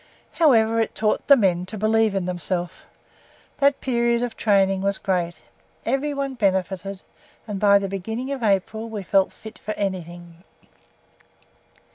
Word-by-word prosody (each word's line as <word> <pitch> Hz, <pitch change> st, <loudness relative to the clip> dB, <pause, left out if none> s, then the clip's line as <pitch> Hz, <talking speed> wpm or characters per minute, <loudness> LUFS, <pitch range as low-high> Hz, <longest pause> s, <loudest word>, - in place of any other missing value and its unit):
However, 230 Hz, -8 st, +3 dB
it 225 Hz, -, -1 dB
taught 215 Hz, -1 st, 0 dB
the 280 Hz, -, +9 dB
men 185 Hz, -6 st, +1 dB
to 215 Hz, -, -7 dB
believe 215 Hz, 0 st, +2 dB
in 190 Hz, -2 st, -1 dB
themselves. 180 Hz, 0 st, -2 dB, 0.9 s
That 280 Hz, 0 st, +3 dB
period 235 Hz, -2 st, +1 dB
of 240 Hz, -2 st, -4 dB
training 195 Hz, -2 st, +2 dB
was 200 Hz, 0 st, 0 dB
great. 175 Hz, -3 st, -2 dB, 0.4 s
Everyone 275 Hz, +1 st, -1 dB
benefited, 195 Hz, -3 st, -1 dB, 0.4 s
and 205 Hz, -2 st, -4 dB
by 200 Hz, 0 st, +6 dB
the 200 Hz, 0 st, -2 dB
beginning 220 Hz, +7 st, -4 dB
of 275 Hz, -2 st, -4 dB
April 220 Hz, +2 st, 0 dB
we 210 Hz, -3 st, -5 dB
felt 190 Hz, +1 st, +2 dB
fit 220 Hz, 0 st, -12 dB
for 215 Hz, -, -5 dB
anything. 175 Hz, -3 st, -5 dB
205 Hz, 140 wpm, -23 LUFS, 190-230 Hz, 0.9 s, the